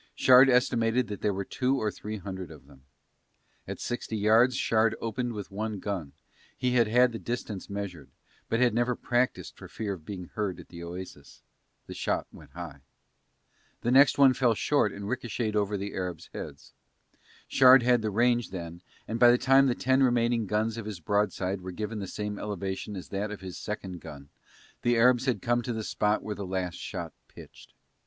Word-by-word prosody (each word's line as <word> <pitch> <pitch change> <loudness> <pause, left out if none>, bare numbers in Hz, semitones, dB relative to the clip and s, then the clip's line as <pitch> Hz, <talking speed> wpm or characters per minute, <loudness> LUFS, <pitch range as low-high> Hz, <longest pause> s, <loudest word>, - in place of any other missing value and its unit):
Shard 130 +1 +7
estimated 120 -2 +2
that 105 - -6
there 105 - +1
were 100 0 -3
two 130 +6 0
or 105 -1 -1
three 110 +1 -6
hundred 95 -2 -7
of 75 -4 -13
them. 70 -2 -19 0.8
At - - -6
sixty 120 -2 -4
yards 110 +5 +4
Shard 110 0 +2
opened 120 +1 -3
with 105 -3 -7
one 105 +1 -3
gun, 95 -8 -4 0.4
he 125 0 0
had 120 -3 +3
had 125 +3 +4
the 115 - -6
distance 115 -5 -5
measured, 100 -8 -6 0.4
but 115 - +1
had 125 -3 +3
never 120 +2 +1
practised 125 +1 -1
for - - -11
fear 105 -3 -4
of 85 -5 -10
being 90 0 -7
heard 105 -4 -2
at - - -13
the 85 -1 -10
oasis: 85 -4 -9 0.4
the - - -8
shot - - -1
went - - -15
high. 85 -4 -8 1.0
The 120 - 0
next 135 +2 +6
one 135 -2 +7
fell 125 -2 +2
short 125 -3 +2
and 100 0 -7
ricochetted 115 -2 -2
over 105 0 0
the 100 +1 -5
Arabs' 90 -4 -5
heads. - - -9 0.7
Shard 130 -1 +7
had 120 -1 +3
the 110 - -1
range 120 +3 +2
then 85 -2 -7 0.3
and 115 +1 -3
by 120 0 +8
the 120 - +5
time 135 +2 +5
the 125 - +1
ten 130 +1 +2
remaining 120 -3 +2
guns 110 +3 0
of 110 - -7
his 105 -4 -6
broadside 100 +1 -1
were 90 0 -6
given 105 +3 -4
the 100 - -5
same 105 0 -4
elevation 100 0 -4
as 95 - -8
that 100 +2 -2
of 105 -2 -7
his 95 -1 -7
second 95 -4 -6
gun 70 -3 -11 0.5
the 120 0 +2
Arabs 125 +2 +4
had 125 - 0
come 120 0 +2
to 120 +1 -3
the 110 -1 -4
spot 105 0 0
where 105 - -3
the 100 - -6
last 90 -2 -3
shot - - -6
pitched. - - -15
105 Hz, 195 wpm, -28 LUFS, 95-120 Hz, 1.0 s, by